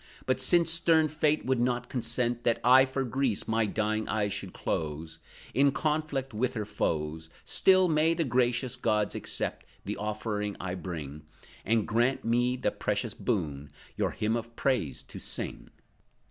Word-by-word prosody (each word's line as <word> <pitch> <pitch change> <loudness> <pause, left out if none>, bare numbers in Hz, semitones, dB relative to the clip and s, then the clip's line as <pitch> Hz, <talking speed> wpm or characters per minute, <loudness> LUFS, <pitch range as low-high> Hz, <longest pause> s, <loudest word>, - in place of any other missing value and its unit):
But 130 0 +1
since 170 +5 +4
stern 165 -1 +4
Fate 155 0 +1
would 130 -1 +1
not 125 0 0
consent 120 -1 -1
That 115 - +2
I 130 +2 +7
for 135 0 -2
Greece 130 -3 -1
my 110 0 +1
dying 110 +1 -1
eyes 105 -2 0
should 100 -2 -5
close, 80 +1 -4 0.3
In 140 +1 +4
conflict 150 -3 -1
with 125 +4 -1
her 105 -2 -2
foes, 80 -4 -2 0.2
Still 185 -1 +4
may 160 +1 +3
the 165 - +1
gracious 125 -1 +1
gods 105 -4 0
accept - - -3 0.2
The - - -3
offering 105 -1 -3
I 90 -1 -3
bring, 80 -6 -6 0.4
And 115 0 +1
grant 120 +4 +2
to - - -6
me 120 +2 +2
the - - 0
precious - - -2
boon, 70 -1 -2 0.3
Your - - 0
Hymn 110 +2 -1
of 115 0 -5
Praise 115 - 0
to - - -10
sing!" - - -4
120 Hz, 160 wpm, -29 LUFS, 105-135 Hz, 0.4 s, I